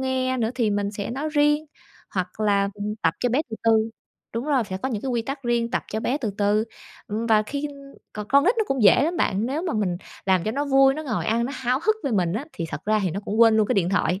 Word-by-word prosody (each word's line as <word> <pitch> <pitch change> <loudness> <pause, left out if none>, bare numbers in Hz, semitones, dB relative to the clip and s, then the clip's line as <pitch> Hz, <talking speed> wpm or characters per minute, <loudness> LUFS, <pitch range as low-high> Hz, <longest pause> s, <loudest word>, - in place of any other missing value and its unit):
nghe 260 0 0
nữa 225 -2 0
thì 230 -4 +1
mình 205 0 -1
sẽ 205 +1 -5
nói 280 +5 -3
riêng, 295 +1 +3 0.5
hoặc 185 +2 -3
là, 200 -2 +2
ừm, 205 +1 -4
tập - - +2
cho 245 - +2
bé 255 +5 +2
từ 220 - -4
từ, 225 0 +3 0.4
đúng 230 - -2
rồi, 280 -5 +2
sẽ 190 -2 -5
có 260 +8 -3
những 215 -5 -3
cái 270 - -3
quy 235 -2 0
tắc 270 +3 -5
riêng, 235 -1 0
tập - - -1
cho 220 - -1
bé 260 +6 0
từ 225 -7 -2
từ. 210 +1 +2 0.4
Ừm, 220 +3 -3
và 215 -2 +4
khi 285 +6 -4 0.4
còn 210 -1 -6
con 280 +1 +5
nít 420 +7 +4
nó 440 - +2
cũng 270 -3 -1
dễ 210 +5 +6
lắm 340 +3 -1
bạn, 210 - +1
nếu 295 +6 -2
mà 345 - -2
mình 195 -5 0 0.3
làm 185 -3 +3
cho 215 - 0
nó 280 +5 -1
vui, 270 -1 +5
nó 310 - -5
ngồi 250 -7 -2
ăn 230 +2 +1
nó 270 - -4
háo 255 +1 0
hức 435 +2 +2
với 270 - -1
mình 180 -4 +1
á, 220 +8 -3
thì 165 - -4
thật 150 - -6
ra 215 +1 +2
thì 185 - 0
nó 195 +5 -4
cũng 210 +2 -2
quên 225 -1 +7
luôn 215 - +3
cái - - 0
điện 180 -3 +2
thoại, 185 -1 +1
230 Hz, 285 wpm, -24 LUFS, 205-270 Hz, 0.5 s, quên